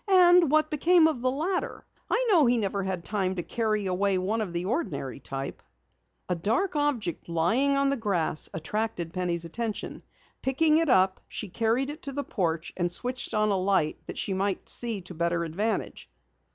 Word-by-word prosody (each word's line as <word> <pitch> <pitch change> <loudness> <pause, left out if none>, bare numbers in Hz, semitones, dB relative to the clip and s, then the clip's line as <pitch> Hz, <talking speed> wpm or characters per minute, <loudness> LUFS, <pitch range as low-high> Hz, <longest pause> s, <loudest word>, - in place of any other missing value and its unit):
And 355 -3 +6
what 310 +1 +3
became 330 +3 +4
of 300 -7 -2
the 255 - +2
ladder? 330 +8 -2 0.2
I - - +1
know 320 -9 +5
he 240 0 +3
never 200 -2 -1
had 185 -3 -3
time 190 -3 -1
to 175 - -3
carry 215 -1 -1
away 190 +1 +1
one 205 +5 -1
of 200 -5 -3
the 175 +1 -3
ordinary 185 - -3
type." 135 0 -6 0.7
A 180 - 0
dark 230 - 0
object 270 - -1
lying 225 +13 +2
on 275 0 +2
the 275 - 0
grass 185 -9 0
attracted 175 -1 -3
Penny's 175 -2 -2
attention. 220 +5 -4 0.4
Picking 305 +4 +3
it 330 -2 +1
up, 190 -4 +3
she 210 - -6
carried 235 +8 0
it 305 - -10
to 275 - -5
the 285 +1 -2
porch 170 - -2
and 175 -1 -1
switched 245 +3 -3
on 215 0 +2
a 200 - +2
light 185 -5 +1
that - - -7
she 195 - -1
might 195 0 -1
see 230 -5 -1
to 180 +1 -10
better 170 +1 0
advantage. 200 +7 -3
210 Hz, 185 wpm, -27 LUFS, 180-275 Hz, 0.7 s, And